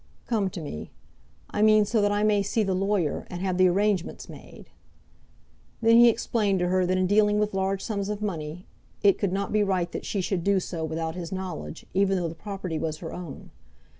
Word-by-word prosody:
"Come 210 Hz, -5 st, 0 dB
to 180 Hz, -, -7 dB
me; 145 Hz, -, -6 dB, 0.6 s
I 210 Hz, -, -1 dB
mean, 215 Hz, -1 st, +6 dB
so 215 Hz, +1 st, +1 dB
that 205 Hz, 0 st, +2 dB
I 205 Hz, 0 st, +1 dB
may 210 Hz, -1 st, +3 dB
see 215 Hz, +3 st, 0 dB
the 195 Hz, -2 st, 0 dB
lawyer, 190 Hz, -4 st, 0 dB
and 175 Hz, -, -6 dB
have 185 Hz, -1 st, -1 dB
the 185 Hz, -, +6 dB
arrangements 195 Hz, 0 st, 0 dB
made." -, -, -13 dB, 1.1 s
Then 230 Hz, 0 st, +5 dB
he 240 Hz, 0 st, +8 dB
explained 215 Hz, -3 st, 0 dB
to 180 Hz, -1 st, 0 dB
her 185 Hz, 0 st, +2 dB
that 185 Hz, +1 st, +1 dB
in 185 Hz, -, +2 dB
dealing 210 Hz, +2 st, +3 dB
with 210 Hz, -1 st, 0 dB
large 190 Hz, 0 st, -1 dB
sums 200 Hz, -3 st, -3 dB
of 210 Hz, -1 st, -3 dB
money, 170 Hz, -4 st, -4 dB, 0.4 s
it 200 Hz, -2 st, +5 dB
could 200 Hz, -3 st, 0 dB
not 200 Hz, +2 st, -2 dB
be 215 Hz, -, +3 dB
right 185 Hz, -4 st, 0 dB
that -, -, -6 dB
she 200 Hz, -, -2 dB
should 185 Hz, -1 st, -1 dB
do 200 Hz, 0 st, +3 dB
so 170 Hz, -2 st, -5 dB
without 160 Hz, +1 st, -3 dB
his 170 Hz, -1 st, -6 dB
knowledge, 185 Hz, -4 st, -6 dB
even 195 Hz, 0 st, +2 dB
though 175 Hz, -2 st, -1 dB
the 160 Hz, -, -5 dB
property 185 Hz, -2 st, -5 dB
was 155 Hz, -2 st, -2 dB
her 165 Hz, 0 st, -7 dB
own. 175 Hz, -5 st, -8 dB
195 Hz, 215 wpm, -26 LUFS, 180-205 Hz, 1.1 s, he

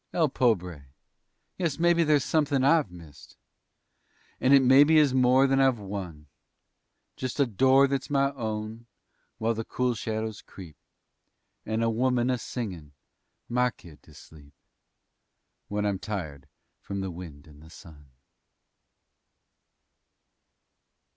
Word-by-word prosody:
El 160 Hz, -4 st, +2 dB
pobre! 90 Hz, -, -1 dB, 0.7 s
Yes, 170 Hz, -6 st, -1 dB
mebbe 170 Hz, 0 st, +3 dB
there's 150 Hz, -3 st, +2 dB
somethin' 145 Hz, -4 st, 0 dB
I've 145 Hz, -, +3 dB
missed, 80 Hz, -5 st, -15 dB, 1.0 s
And 130 Hz, -, +2 dB
it 140 Hz, -1 st, +6 dB
mebbe 135 Hz, +4 st, +6 dB
is 155 Hz, -4 st, +4 dB
more 130 Hz, +1 st, +4 dB
than 135 Hz, 0 st, +2 dB
I've 135 Hz, -2 st, +3 dB
won 95 Hz, -7 st, -7 dB, 0.9 s
Just 130 Hz, +2 st, -5 dB
a 140 Hz, -, +4 dB
door 130 Hz, +5 st, +4 dB
that's 135 Hz, -1 st, -3 dB
my 140 Hz, -1 st, +1 dB
own, 110 Hz, -2 st, -6 dB, 0.5 s
while 115 Hz, +1 st, 0 dB
the 115 Hz, 0 st, -4 dB
cool 125 Hz, +2 st, -1 dB
shadows 110 Hz, -1 st, -4 dB
creep, 85 Hz, -6 st, -13 dB, 0.9 s
And 110 Hz, +1 st, -1 dB
a 115 Hz, -, +2 dB
woman 125 Hz, +1 st, +1 dB
a 125 Hz, -, -1 dB
singin' 90 Hz, -, -7 dB, 0.5 s
my 125 Hz, +1 st, +1 dB
kid 85 Hz, -9 st, -16 dB
to -, -, -19 dB
sleep 75 Hz, -2 st, -16 dB, 1.1 s
When 105 Hz, 0 st, -2 dB
I'm 100 Hz, -2 st, -1 dB
tired 80 Hz, -11 st, -6 dB, 0.3 s
from 100 Hz, -1 st, -6 dB
the 95 Hz, -1 st, -4 dB
wind 85 Hz, -5 st, -10 dB
and 75 Hz, -2 st, -17 dB
the 80 Hz, -, -15 dB
sun. 75 Hz, -4 st, -15 dB
115 Hz, 130 wpm, -27 LUFS, 90-135 Hz, 1.1 s, it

